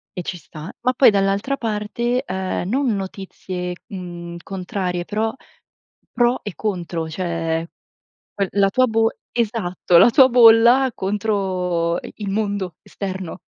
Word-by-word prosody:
e 180 Hz, -, -3 dB
ci 180 Hz, -, -5 dB
sta, 160 Hz, +3 st, -10 dB
ma 250 Hz, +1 st, +2 dB
poi 255 Hz, 0 st, +6 dB
dall'altra 200 Hz, +7 st, 0 dB
parte, 235 Hz, +3 st, -2 dB
ehm, 185 Hz, -1 st, -3 dB
non 270 Hz, +5 st, +1 dB
notizie, 185 Hz, -2 st, -5 dB
mhmm, 175 Hz, -2 st, -7 dB
contrarie 180 Hz, -2 st, -3 dB
però 220 Hz, +3 st, -1 dB, 0.8 s
pro 240 Hz, +1 st, +2 dB
e 205 Hz, -, -5 dB
contro, 175 Hz, -5 st, -3 dB
cioè 165 Hz, -2 st, -2 dB, 0.7 s
quel 200 Hz, -2 st, -1 dB
la 200 Hz, -1 st, +3 dB
tua 255 Hz, +5 st, +3 dB
bo 225 Hz, -1 st, +2 dB, 0.2 s
esatto, 205 Hz, -7 st, +1 dB
la -, -, +8 dB
tua 260 Hz, +2 st, +7 dB
bolla, 240 Hz, +2 st, +6 dB
contro 190 Hz, -4 st, -1 dB
i -, -, -10 dB
il 205 Hz, -2 st, -4 dB
mondo 200 Hz, -4 st, -2 dB
esterno. 190 Hz, -3 st, -6 dB
195 Hz, 135 wpm, -21 LUFS, 180-225 Hz, 0.8 s, la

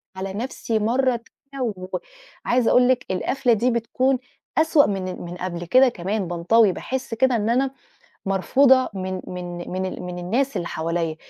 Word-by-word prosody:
على 190 Hz, 0 st, -5 dB
نفسي 225 Hz, 0 st, -2 dB
مرة 245 Hz, +3 st, +1 dB, 0.3 s
تانية، 270 Hz, -2 st, -2 dB, 0.8 s
وعايزة 245 Hz, -1 st, +2 dB
أقول 250 Hz, 0 st, +5 dB
لِك 250 Hz, -1 st, +2 dB
القفلة 245 Hz, +7 st, +1 dB
دي 235 Hz, +3 st, +2 dB
بتكون 250 Hz, +3 st, +1 dB, 0.4 s
أسوأ 315 Hz, -2 st, +5 dB
من 185 Hz, -2 st, -3 dB
من 175 Hz, 0 st, -7 dB
قبل 175 Hz, -1 st, -4 dB
كده 255 Hz, +8 st, +5 dB
كمان، 195 Hz, -1 st, -3 dB
بانطوي، 180 Hz, +5 st, +3 dB
باحسّ 260 Hz, +5 st, -4 dB
كده 255 Hz, +2 st, +2 dB
إن 220 Hz, -1 st, 0 dB
أنا 260 Hz, +3 st, +2 dB, 0.5 s
مرفوضة 255 Hz, +7 st, +4 dB
من 185 Hz, -1 st, -4 dB
من 175 Hz, -1 st, -6 dB
من 185 Hz, +1 st, -2 dB
ال 185 Hz, -, -5 dB
من 180 Hz, 0 st, -6 dB
الناس 245 Hz, +10 st, 0 dB
اللي 170 Hz, -, -3 dB
حواليّا، 165 Hz, 0 st, -2 dB
220 Hz, 160 wpm, -23 LUFS, 185-255 Hz, 0.8 s, أقول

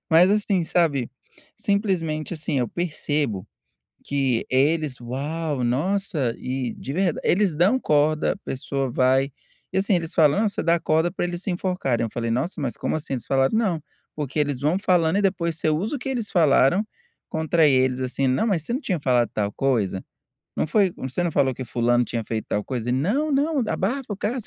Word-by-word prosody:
Mas 170 Hz, +4 st, +6 dB
assim, 205 Hz, -3 st, +2 dB
sabe? 150 Hz, -7 st, +1 dB, 0.5 s
Simplesmente 180 Hz, -7 st, -1 dB
assim 155 Hz, -3 st, -2 dB
eu 120 Hz, -, -1 dB
percebo 150 Hz, -, -2 dB, 0.6 s
que 135 Hz, -4 st, 0 dB
eles: 145 Hz, 0 st, +1 dB
"Uau, 140 Hz, +3 st, -3 dB
nossa!", 155 Hz, -, 0 dB
e 130 Hz, -1 st, -3 dB
de 135 Hz, -, -6 dB
verd 180 Hz, 0 st, 0 dB
eles 185 Hz, -4 st, +2 dB
dão 195 Hz, +10 st, +4 dB
corda, 150 Hz, -, +2 dB
a -, -, -6 dB
pessoa 135 Hz, 0 st, -3 dB
vai 130 Hz, +3 st, +2 dB, 0.4 s
e, -, -, +1 dB
assim, 195 Hz, +1 st, +2 dB
eles 165 Hz, -2 st, -2 dB
falam: 160 Hz, +3 st, +4 dB
"Ah, -, -, +3 dB
você 200 Hz, -, -3 dB
dá 170 Hz, 0 st, +3 dB
corda 160 Hz, +3 st, +2 dB
pra 180 Hz, -, -2 dB
eles 175 Hz, 0 st, -4 dB
se 195 Hz, -, -2 dB
enforcarem.", 175 Hz, -10 st, -1 dB
eu 115 Hz, -, -4 dB
falei: 115 Hz, -1 st, -3 dB
"Nossa, 145 Hz, +8 st, -1 dB
mas 130 Hz, -4 st, -3 dB
como -, -, -2 dB
assim?". 155 Hz, -3 st, -4 dB
Eles 125 Hz, -, -5 dB
falaram: 135 Hz, +8 st, +2 dB
"Não, 185 Hz, -9 st, 0 dB, 0.3 s
porque 150 Hz, -1 st, -4 dB
eles 145 Hz, -3 st, 0 dB
vão 155 Hz, +6 st, +1 dB
falando 180 Hz, -3 st, +2 dB
e -, -, +1 dB
depois 170 Hz, -4 st, 0 dB
você -, -, 0 dB
usa 195 Hz, -, -1 dB
o -, -, -6 dB
que 255 Hz, -, -6 dB
eles 240 Hz, -5 st, -2 dB
falaram 165 Hz, +4 st, +4 dB, 0.4 s
contra 160 Hz, 0 st, +2 dB
eles, 130 Hz, -2 st, +2 dB
assim." 130 Hz, +1 st, -1 dB
"Não, 130 Hz, -, +1 dB
mas 190 Hz, -8 st, +1 dB
você 235 Hz, -, -5 dB
não 260 Hz, -, -1 dB
tinha 185 Hz, -, -1 dB
falado 125 Hz, -3 st, +2 dB
tal 105 Hz, -1 st, -1 dB
coisa?" 105 Hz, -9 st, 0 dB, 0.5 s
"Não -, -, +1 dB
foi, 195 Hz, +4 st, +3 dB
você 130 Hz, +7 st, -3 dB
não 175 Hz, -, 0 dB
falou 135 Hz, -2 st, +2 dB
que 130 Hz, +1 st, -6 dB
fulano 120 Hz, +1 st, +2 dB
tinha 115 Hz, -1 st, -3 dB
feito 110 Hz, 0 st, -4 dB
tal 105 Hz, -, 0 dB
coisa? 125 Hz, -2 st, -3 dB
Não, 210 Hz, -, +1 dB
não, 285 Hz, 0 st, +1 dB
abafa 250 Hz, +9 st, -1 dB
o -, -, -4 dB
caso". 225 Hz, +3 st, -3 dB
155 Hz, 195 wpm, -24 LUFS, 130-185 Hz, 0.6 s, Mas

